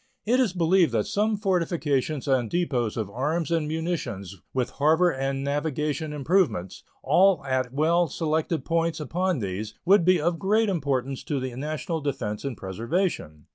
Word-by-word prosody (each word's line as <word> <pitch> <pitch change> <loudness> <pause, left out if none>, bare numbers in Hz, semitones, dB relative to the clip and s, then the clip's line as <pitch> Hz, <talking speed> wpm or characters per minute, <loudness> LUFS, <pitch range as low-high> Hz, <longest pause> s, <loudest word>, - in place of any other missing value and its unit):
It 245 +4 +3
is 250 -7 +3
believed 175 -4 +3
that 110 -2 +1
some 210 +1 0
fortifications 160 - 0
and 130 -4 +2
depots 130 -11 -1
of 110 -3 -1
arms 155 +8 -1
and 165 -3 +1
munitions, 150 - -4
with 130 -2 -1
harbor 160 +5 +3
and 135 0 -2
navigation 150 +2 -2
improvements, 150 - 0 0.2
all 185 -6 +4
at 130 -2 -1
well 165 +5 +2
selected 160 +2 -1
points 165 -1 0
upon 175 +4 -1
these, 105 0 -4
would 195 0 +5
be 185 +1 +4
of 165 +1 0
great 215 +3 +2
importance 140 -7 -1
to 145 -3 -1
the 130 -2 -4
national 155 +4 -3
defense 105 -7 -3
and 135 -5 -4
preservation. 105 - -2
150 Hz, 155 wpm, -26 LUFS, 130-175 Hz, 0.2 s, would